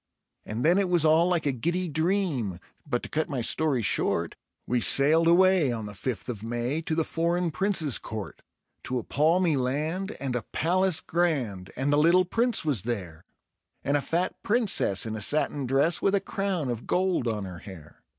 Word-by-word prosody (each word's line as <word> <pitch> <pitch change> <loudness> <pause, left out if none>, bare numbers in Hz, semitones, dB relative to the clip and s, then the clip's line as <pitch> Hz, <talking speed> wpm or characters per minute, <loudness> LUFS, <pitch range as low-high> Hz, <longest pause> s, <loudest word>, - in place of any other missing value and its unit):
And 110 +6 -3
then 175 +4 +4
it 195 -2 0
was 175 -3 +3
all 160 +2 +4
like 175 -4 0
a 140 - +2
giddy 170 +9 -2
dream; 160 - -1 0.3
but 125 -4 -2
to - - -6
cut 155 +2 -2
my 135 -4 -2
story 135 0 0
short, - - 0 0.3
We 125 -1 0
sailed 155 +7 +4
away 180 -4 +4
on 110 -2 -4
the 105 - -8
fifth 105 +1 -5
of 115 -5 -5
May 120 +6 -2
to 160 -1 -3
the 165 - +1
foreign 170 +2 -1
Prince's 170 - +1
court; 110 -3 -7 0.4
To 130 - -2
a 120 - -3
palmy 165 +2 +2
land 155 +10 -2
and 135 -3 -3
a 125 - -1
palace 180 +1 +1
grand, 130 - -1
and 140 +3 0
the - - +3
little 175 +4 +4
Prince 230 +1 +1
was 140 - +1
there, 90 -8 -5 0.6
And 140 - 0
a 145 - +1
fat 175 +5 -1
Princess 215 - +2
in 110 -1 -4
a 110 - -5
satin 145 +2 +1
dress 140 +6 +2
with 195 - +2
a - - +3
crown 190 -10 -3
of 120 -1 -6
gold 180 -8 0
on 105 -3 -2
her 90 -2 -8
hair. 85 -7 -13
150 Hz, 190 wpm, -26 LUFS, 120-175 Hz, 0.6 s, then